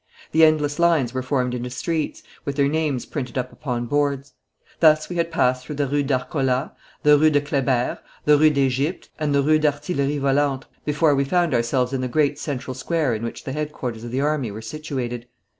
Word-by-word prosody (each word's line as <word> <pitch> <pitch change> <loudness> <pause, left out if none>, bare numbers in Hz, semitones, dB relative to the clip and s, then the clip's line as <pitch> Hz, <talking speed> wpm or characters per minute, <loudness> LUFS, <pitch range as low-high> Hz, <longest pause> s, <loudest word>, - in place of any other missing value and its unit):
The 160 - +4
endless 150 -1 +3
lines 160 -8 +3
were 130 - -1
formed 125 -1 -1
into 125 0 -4
streets, 155 +4 -3 0.2
with 140 - -3
their 140 -1 +3
names 150 -4 -1
printed 130 -4 -5
up 130 0 -2
upon 120 -4 -3
boards. 140 +1 -1 0.5
Thus 155 -1 +4
we 175 - -4
had 170 0 0
passed 125 0 +1
through 150 - -6
the 145 0 0
Rue 145 +2 0
d'Arcola, 135 0 -1 0.3
the 150 0 +6
Rue 155 +1 +5
de 145 -1 +3
Kleber, 135 -4 0 0.3
the 150 - +6
Rue 155 +1 +6
d'Egypte, 140 +3 0
and 150 -2 0
the 140 - +3
Rue 155 +2 +4
d'Artillerie 145 -1 0
Volante, 140 -1 +1 0.2
before 150 0 +3
we 140 0 +2
found 170 +2 +1
ourselves 125 +2 +1
in 130 - -1
the 130 - -1
great 145 +2 +1
central 130 -3 -4
square 145 0 0
in 110 - -3
which 115 - -5
the 130 - -5
headquarters 135 -6 -4
of 120 - -6
the 130 +3 -1
army 145 -5 0
were 105 +2 -7
situated. 125 -3 -5
140 Hz, 200 wpm, -22 LUFS, 130-150 Hz, 0.5 s, the